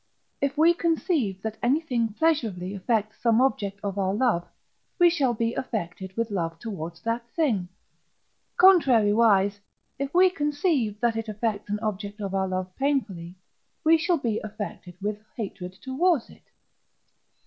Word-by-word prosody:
If 280 +1 0
we 330 +3 +6
conceive 315 - 0
that 220 -1 -4
anything 245 -4 +1
pleasurably 220 - 0
affects 215 +2 -1
some 230 -1 +3
object 205 -7 0
of 200 -1 -3
our 190 0 0
love, 210 -8 +1 0.5
we 350 -1 +6
shall 270 -8 +1
be 230 +1 0
affected 190 -5 -5
with 230 -1 -1
love 165 -4 -2
towards 170 -4 -7
that 235 +1 -2
thing. 225 - +1 0.9
Contrariwise, 225 - +5 0.4
if 275 0 -2
we 365 +1 +5
conceive 290 - 0
that 235 -2 +2
it 225 -1 -4
affects 210 -1 -2
an 210 - 0
object 205 -1 -4
of 200 -2 -4
our 190 0 +1
love 185 0 -4
painfully, 210 -12 -1 0.5
we 320 +1 +6
shall 345 +2 +2
be 230 -6 -1
affected 205 -4 -7
with 210 0 -2 0.2
hatred 185 -5 -5
towards 275 - 0
it. - - -20
225 Hz, 145 wpm, -26 LUFS, 195-275 Hz, 0.9 s, we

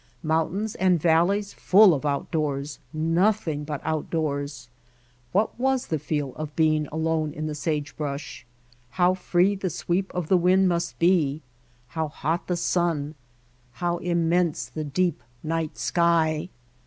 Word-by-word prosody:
Mountains 165 +7 0
and 185 -2 +2
valleys 175 +6 +2
full 195 -1 +6
of 150 0 -2
outdoors, 145 0 -2
nothing 165 0 +1
but 150 -1 -4
outdoors! 145 -4 -2 0.6
What 210 +5 0
was 265 0 +1
the 155 - -2
feel 145 -3 -2
of 150 -1 -6
being 155 -2 +2
alone 160 0 -1
in 155 - -4
the 155 - -3
sagebrush? 150 -1 -4 0.5
How 180 0 +4
free 185 +1 +2
the 195 -2 -3
sweep 180 +4 -2
of 180 -3 -2
the 185 - +4
wind 185 +2 +4
must 170 -1 -1
be, 160 -5 +2 0.5
how 160 -1 -2
hot 160 +3 -3
the 180 - 0
sun, 165 -4 0 0.6
how 175 +5 -1
immense 170 -4 +1
the 155 +5 -5
deep 170 +2 0 0.2
night 160 0 -2
sky! 170 -1 +1
160 Hz, 135 wpm, -25 LUFS, 150-180 Hz, 0.6 s, full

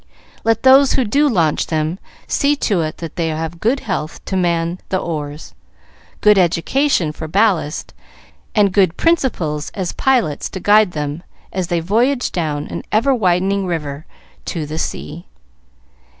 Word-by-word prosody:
Let 225 -1 +1
those 265 +1 +6
who 260 - +2 0.2
launch 165 - +1
them 160 +3 -1 0.3
see 285 +1 +1
to 205 -10 0
it 155 -1 -3
that 165 -1 -8
they 165 -2 0
have 160 +1 -4
good 250 +8 +1
health 165 -7 -4
to 190 - -3
man 170 -1 0
the 190 - +1
oars, 150 -4 -5 0.7
good 210 -1 +5
education 180 - +1
for 155 +1 -7
ballast, 180 -4 0 0.6
and 205 -3 +3
good 185 -4 +3
principles 185 - 0
as 185 -3 -3
pilots 240 - +1
to 190 - -6
guide 205 -1 +4
them 150 +1 -3 0.3
as 185 -2 -2
they 170 -2 0
voyage 240 +9 +1
down 150 -4 -2
an - - -5
ever 230 +6 +3
widening 195 -2 +1
river 150 -4 -4 0.4
to 160 -3 -3
the 155 +2 -5
sea. 170 +1 -5
180 Hz, 150 wpm, -18 LUFS, 160-215 Hz, 0.7 s, those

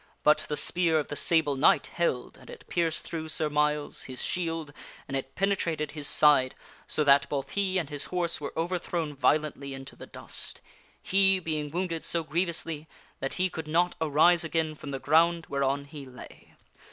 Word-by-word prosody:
But 150 +1 +5
the 150 - -1
spear 165 +1 +2
of 150 - -1
the 145 - -4
Sable 160 -2 +3
Knight 135 - +4
held 150 -8 -1
and - - -16
it - - -11
pierced 165 -2 0
through 160 -1 -5
Sir 155 -1 -1
Myles, 150 0 0
his 130 -1 -5
shield, 165 -4 -2 0.3
and 135 - -4
it 135 0 -4
penetrated 170 -6 0
his 150 -2 -4
side, 145 -4 +4 0.3
so 155 - +1
that 140 0 +5
both 140 -2 -3
he 195 -2 0
and 170 -5 0
his 145 -1 -3
horse 175 -3 -1
were 140 - -4
overthrown 170 -2 -2
violently 140 -1 0
into 135 0 -9
the - - -11
dust; - - -9 0.4
he 195 0 +4
being 155 -4 -3
wounded 165 0 -2
so 170 -1 -1
grievously 165 -1 -2 0.3
that 135 - -3
he 185 0 +2
could 160 -3 -6
not 175 +3 +2
arise 160 +3 +4
again 160 -1 -1
from 150 -1 -9
the 135 - -3
ground 165 +4 +3
whereon 140 0 0
he 145 0 -9
lay. 125 -1 -13
155 Hz, 180 wpm, -28 LUFS, 145-170 Hz, 0.4 s, But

